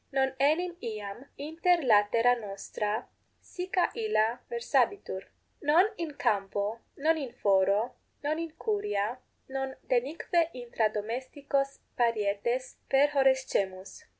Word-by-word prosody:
Non 265 -1 +1
enim 340 +5 +2
iam 215 +1 -5
inter 330 +4 +1
latera 230 +1 +5
nostra 210 +1 -3 0.3
sica 365 0 -1
illa 265 - +1
versabitur; 405 - 0 0.3
non 310 +6 +5
in 325 -5 -5
campo, 205 -2 0 0.2
non 315 +3 +2
in 270 -5 -4
foro, 200 +1 +2 0.3
non 305 +2 0
in 330 0 -3
curia, 405 - -1 0.3
non 270 0 -3
denique 315 +6 +1
intra 235 -3 0
domesticos 265 +6 -2
parietes 235 +2 0
perhorrescemus. 265 -9 +2
260 Hz, 100 wpm, -30 LUFS, 215-310 Hz, 0.3 s, latera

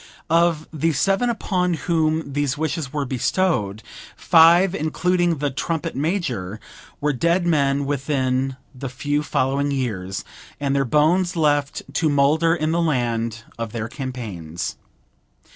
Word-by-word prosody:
Of 165 -2 +3
the 160 +1 +1
seven 195 - +2
upon 180 -6 0
whom 160 -3 0
these 145 -1 0
wishes 155 -2 -2
were 145 -2 -2
bestowed, 125 - 0 0.3
five, 170 +2 +6
including 175 0 +1
the 145 0 -1
trumpet 160 +4 -3
major, 130 - -2 0.4
were 150 0 +1
dead 170 +7 +1
men 140 -4 +2
within 135 -2 -1 0.2
the 130 0 -6
few 145 +3 -1
following 140 0 0
years, 110 -9 -3 0.3
and 140 -1 0
their 135 0 +2
bones 175 +7 +2
left 145 -3 +1
to 160 - +2
moulder 150 +4 +3
in 155 -1 -1
the 170 +1 +1
land 115 -7 -1 0.2
of 115 -1 -4
their 115 -2 -3
campaigns. 110 - -5
145 Hz, 130 wpm, -22 LUFS, 130-165 Hz, 0.4 s, five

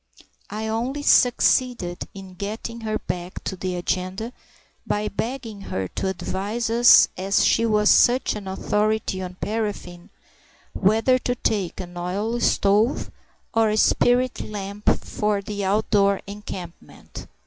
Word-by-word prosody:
I 220 +1 -4
only 245 +6 -2
succeeded 245 -8 +2
in 190 -1 -10
getting 215 +4 -6
her 215 -1 -2
back 180 -2 -6
to 190 - -3
the 185 0 -3
agenda, 185 +6 -3 0.5
by 210 0 0
begging 225 -2 -5
her 95 0 -2
to - - -3
advise 205 +5 -3
us, 240 +1 +7
as 190 +1 +2
she 230 0 +3
was 210 -1 +4
such 245 -1 +4
an 205 -2 -7
authority 210 0 -1
on 180 -1 -6
paraffin, 205 -5 -4 0.6
whether 225 +6 +3
to 245 0 -1
take 200 -7 -1
an 175 -1 -8
oil 200 +7 -2
stove 210 +2 +2 0.4
or 225 -1 +3
a 210 - 0
spirit 245 +3 +2
lamp 200 0 -3 0.2
for 210 -1 -1
the 200 +1 -5
outdoor 200 0 +2
encampment. 195 -4 -9
210 Hz, 130 wpm, -23 LUFS, 190-225 Hz, 0.6 s, us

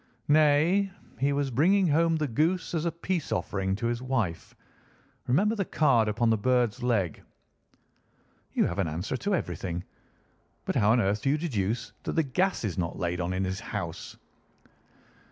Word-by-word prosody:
"Nay, 155 +6 +4 0.3
he 140 +1 +2
was 140 -1 0
bringing 180 - +3
home 165 +2 +3
the 155 -2 0
goose 165 +8 0
as 165 -1 -1
a 170 - +1
peace 170 0 -3
offering 95 +1 -1
to 115 +4 -4
his 120 +1 -1
wife. 120 -10 -2 0.7
Remember 200 - +3
the 205 -3 -1
card 130 - +2
upon 115 +2 +1
the 110 - +2
bird's 125 0 +1
leg." 105 -9 0 1.3
"You - - +2
have 90 - -3
an 95 - +1
answer 85 +11 -3
to 200 +8 0
everything. 90 - -4 0.8
But - - -2
how 105 +1 +4
on 120 - +3
earth 100 +1 0
do - - 0
you 145 - +2
deduce 115 - -2
that - - -4
the 160 - +2
gas 180 +7 0
is 95 -5 -2
not 85 -1 -2
laid 90 0 -2
on 90 +1 -2
in 95 +1 -1
his 95 0 -2
house?" - - -6
125 Hz, 170 wpm, -28 LUFS, 100-160 Hz, 1.3 s, Nay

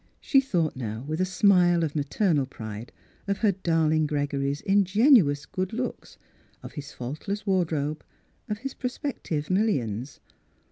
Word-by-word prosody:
She 270 -3 +4
thought 175 - 0
now 115 -2 -5
with 155 +3 -2
a - - +3
smile 180 -3 +4
of 155 -2 -2
ma 150 - +1
ternal 145 -2 +1
pride 110 -2 -8 0.4
of 200 0 0
her 205 - +5
darling 160 -4 +1
Gregory's 145 -1 -1
in 200 0 +3
genuous 190 - +4
good 185 +5 -3
looks, 250 +2 -5 0.5
of - - -8
his 145 -1 -7
faultless 155 +12 -5
ward 185 -5 +1
robe, 150 0 -2 0.5
of 210 - -1
his 270 +4 -6
prospective 250 - -4
millions. 135 - 0
165 Hz, 150 wpm, -26 LUFS, 145-200 Hz, 0.5 s, her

